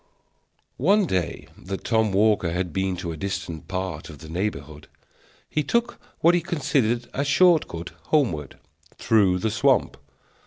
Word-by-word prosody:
One 200 +7 +4
day 90 - -2
that 95 +1 -7
Tom 110 -2 +1
Walker 100 -3 +2
had 90 -1 -2
been 95 -1 -1
to 85 -1 -4
a 80 - -6
distant 85 -3 -5
part 95 -4 -4
of 75 - -10
the 80 +2 -12
neighborhood, 75 -5 -4 0.6
he 155 - -1
took 235 - -1 0.2
what 170 +2 +5
he 175 - +2
considered 130 -8 0
a 140 - -1
short 165 +3 +4
cut 85 +1 -7
homeward, 85 - 0 0.4
through 100 -5 +3
the 105 +4 -1
swamp. 125 +1 +2
100 Hz, 150 wpm, -24 LUFS, 85-140 Hz, 0.6 s, what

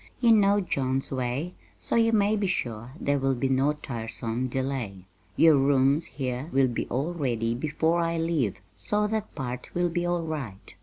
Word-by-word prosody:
You 235 -2 +5
know 205 -2 +5
John's 135 -6 -1
way, 130 +6 -2 0.2
so - - -2
you 230 0 +4
may 210 -1 +3
be 200 -2 0
sure 120 -7 -3
there 140 0 +1
will 135 0 +1
be 135 +2 0
no 135 +3 +2
tiresome 115 -2 -4
delay. 125 -8 -3 0.3
Your 160 -2 +6
rooms 140 +2 +3
here 130 +2 -4
will 135 -1 +3
be 120 - -3
all 140 +8 -2
ready 120 -8 -1
before 160 +6 0
I 165 0 0
leave, 160 - 0 0.2
so 210 - 0
that 215 0 -3
part 125 -2 -5
will 175 0 +2
be 175 +1 -1
all 175 -1 0
right. 135 - -6
140 Hz, 175 wpm, -27 LUFS, 125-170 Hz, 0.3 s, Your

